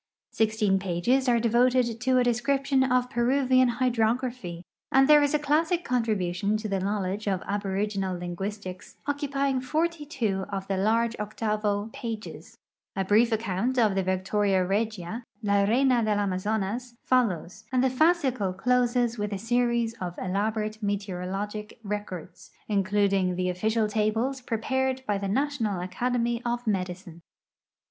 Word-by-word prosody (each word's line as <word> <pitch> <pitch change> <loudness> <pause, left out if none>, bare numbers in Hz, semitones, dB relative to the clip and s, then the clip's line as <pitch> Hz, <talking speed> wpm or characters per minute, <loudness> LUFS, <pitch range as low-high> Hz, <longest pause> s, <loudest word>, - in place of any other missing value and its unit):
Sixteen 215 -3 +2
pages 195 +9 +1
are 235 -1 +4
devoted 240 0 +2
to 255 0 +3
a 250 - +4
description 265 +3 +1
of 250 -1 +1
Peruvian 255 0 +3
hyilrography, 235 -6 -1 0.3
and 270 0 +5
there 300 0 +7
is 290 +1 +2
a - - +5
classic 320 +4 +1
contrihntiou 210 -4 0
to 215 0 -5
the 195 -2 -1
knowledge 200 +1 -2
of 190 -2 0
aboriginal 200 -1 -2
linguistic;s 185 +2 -6
occu|tying 280 -2 0
forty 315 +4 -1
two 220 -10 -2
of 195 -1 -4
the 195 - 0
largo 225 +4 +1
octavo 210 -1 -1
pages. 225 -2 -7 0.2
\ 195 -3 -5
brief 225 +4 +4
account 220 +3 -1
of 220 -4 +4
the 195 - +1
Victoria 190 +1 +1
regia, 215 +2 -2
" - - -36
la 200 -1 +3
reina 250 +3 +3
<lcl 215 -2 +1
.Gna 185 - -1
zonas 220 +5 -2
" - - -40
folhjws, 215 -5 0
and 255 -1 +2
tiie 260 - +2
fascicle 260 - +2
ch)ses 245 0 +1
with 210 0 -2
a 200 - -2
series 235 +1 +1
of 175 -1 -4
elaborate 215 +3 -2
met<'oro 195 -3 -3
logic 210 +2 -5
records, 200 -4 -6 0.2
including 195 -2 +1
the 185 0 0
official 215 +5 0
tables 220 +5 0
preparnl 260 +3 -1
l)y 205 -1 0
the 200 - -3
National 225 -4 0
Academy 235 +5 -1
of 240 0 -2
.Medicine. 185 -4 -3
220 Hz, 145 wpm, -27 LUFS, 195-250 Hz, 0.3 s, there